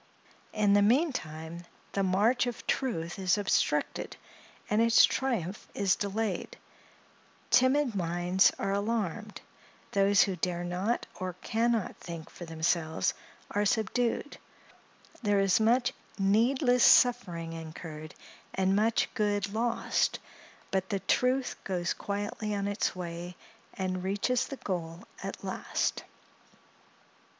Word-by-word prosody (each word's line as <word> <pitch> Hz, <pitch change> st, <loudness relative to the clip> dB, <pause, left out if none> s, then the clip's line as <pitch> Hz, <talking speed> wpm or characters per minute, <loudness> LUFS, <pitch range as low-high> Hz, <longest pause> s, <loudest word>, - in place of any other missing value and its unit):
In 210 Hz, -2 st, +2 dB
the 205 Hz, -, +5 dB
meantime, 175 Hz, -, 0 dB, 0.3 s
the 200 Hz, -, -1 dB
march 205 Hz, +7 st, +2 dB
of 240 Hz, -, -5 dB
truth 175 Hz, -10 st, -2 dB
is 185 Hz, 0 st, +2 dB
obstructed, 205 Hz, -1 st, 0 dB, 0.5 s
and 210 Hz, +2 st, +2 dB
its 230 Hz, 0 st, +7 dB
triumph 215 Hz, -8 st, -2 dB
is 195 Hz, -2 st, +2 dB
delayed; 205 Hz, -2 st, -3 dB, 0.9 s
timid 260 Hz, 0 st, +4 dB
minds 175 Hz, 0 st, +2 dB
are 195 Hz, -, -1 dB
alarmed; 210 Hz, 0 st, -2 dB, 0.5 s
those 200 Hz, 0 st, +5 dB
who 195 Hz, -3 st, -2 dB
dare 175 Hz, 0 st, -2 dB
not 180 Hz, +7 st, -1 dB
or 185 Hz, -1 st, -3 dB
can 235 Hz, +2 st, +1 dB
not 225 Hz, -4 st, -2 dB
think 170 Hz, -2 st, -8 dB
for 175 Hz, -, -9 dB
themselves, 160 Hz, 0 st, 0 dB, 0.4 s
are 205 Hz, -, +1 dB
subdued; 235 Hz, +6 st, 0 dB, 0.8 s
there 205 Hz, -3 st, +2 dB
is 195 Hz, 0 st, +3 dB
much 235 Hz, +3 st, +3 dB, 0.2 s
needless 245 Hz, +5 st, +3 dB
suffering 175 Hz, -10 st, +4 dB
incurred, 160 Hz, -1 st, -8 dB, 0.4 s
and 190 Hz, 0 st, +2 dB
much 220 Hz, +2 st, +2 dB
good 205 Hz, -3 st, 0 dB
lost; 230 Hz, +1 st, 0 dB, 0.5 s
but 190 Hz, -1 st, -1 dB
the 200 Hz, -1 st, -1 dB
truth 255 Hz, +1 st, +1 dB
goes 175 Hz, -2 st, -1 dB
quietly 205 Hz, +1 st, -3 dB
on 200 Hz, 0 st, -1 dB
its 205 Hz, -1 st, -1 dB
way, 175 Hz, 0 st, -6 dB, 0.4 s
and 185 Hz, -1 st, -2 dB
reaches 205 Hz, +7 st, 0 dB
the 275 Hz, -, -6 dB
goal 170 Hz, -4 st, -4 dB, 0.2 s
at -, -, -6 dB
last. -, -, -2 dB
200 Hz, 120 wpm, -30 LUFS, 180-230 Hz, 0.9 s, its